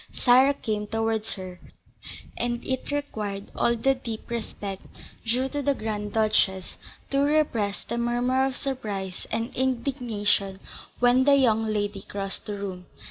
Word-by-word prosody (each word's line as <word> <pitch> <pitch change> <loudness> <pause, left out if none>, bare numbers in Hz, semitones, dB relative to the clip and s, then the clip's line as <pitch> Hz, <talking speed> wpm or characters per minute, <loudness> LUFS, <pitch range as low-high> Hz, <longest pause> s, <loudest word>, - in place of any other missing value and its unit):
Sarah 260 +3 +5
came 210 -4 -2
towards 225 0 -1
her, 185 -2 -8 0.8
and 240 0 -2
it 260 -1 -1
required 210 -9 -3
all 235 - +3
the 270 +4 +3
deep 235 -3 -6
respect 205 -4 -4 0.4
due 245 +3 +1
to 290 +1 -2
the 280 0 +2
Grand 210 -2 -3
Duchess 215 -4 +2 0.3
to 275 - +2
repress 280 -9 +1
the 235 - -3
murmur 245 +2 +2
of 265 - -4
surprise 205 -9 -4
and 225 +1 -2
indignation 235 -7 0 0.4
when 245 +1 +4
the 285 -1 +7
young 225 -5 +3
lady 205 -2 -1
crossed 195 0 -4
the 205 -1 -3
room. 185 -2 -6
225 Hz, 140 wpm, -26 LUFS, 205-260 Hz, 0.8 s, the